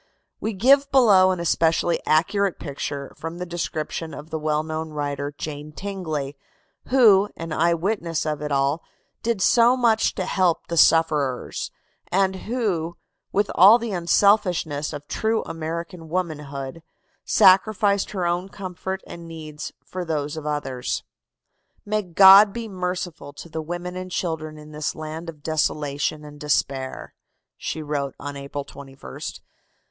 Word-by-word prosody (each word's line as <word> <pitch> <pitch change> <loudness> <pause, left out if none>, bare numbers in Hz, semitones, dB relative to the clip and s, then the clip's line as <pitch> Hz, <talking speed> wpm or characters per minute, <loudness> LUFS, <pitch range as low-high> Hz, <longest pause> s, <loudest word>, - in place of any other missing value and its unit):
We 220 - -2
give 275 +8 +4
below 205 -9 +6
an 185 -1 0
especially 165 0 +1
accurate 195 +5 +2
picture 140 -1 -5
from 165 +1 -6
the 180 - -4
description 165 -2 -4
of 150 +2 -10
the 160 - -2
well 155 0 0
known 160 0 -4
writer, 145 -1 -3
Jane 150 0 -6
Tingley, 155 -7 -4 0.5
who, 210 -6 +5
an 165 -1 -5
eye 170 +2 +3
witness 170 -3 -1
of 150 -1 -2
it 150 -1 -4
all, 140 +3 +1 0.4
did 230 -4 0
so 240 +2 +5
much 225 -3 +2
to 185 - -2
help 180 -3 +1
the 170 - -4
sufferers, 155 -5 +2 0.4
and 190 +1 +2
who, 190 -9 -1 0.3
with 205 +1 +1
all 200 +6 +8
the 235 -2 -4
unselfishness 175 -4 +2
of 145 -1 -8
true 220 0 0
American 165 +1 -6
womanhood, 150 -4 -4 0.4
sacrificed 200 +1 +4
her 185 -4 -2
own 175 +2 -1
comfort 190 0 -5
and 170 -1 -9
needs 155 -2 -7
for 185 0 -5
those 150 -3 -2
of 155 -1 -6
others. 135 -4 -2 0.8
"May 215 +1 0
God 195 +2 +8
be 235 -1 -5
merciful 180 -5 -4
to 170 - -10
the 160 0 -4
women 175 +3 -5
and 185 0 -5
children 160 -4 -3
in 150 0 -12
this 150 0 -3
land 160 +2 -6
of 150 -3 -11
desolation 150 -1 -1
and 145 0 -11
despair!" 135 -2 -1 0.4
she 160 - -4
wrote 145 -2 -3
on 145 0 -6
April 140 0 -6
21st. 135 - -9
165 Hz, 145 wpm, -23 LUFS, 150-190 Hz, 0.8 s, all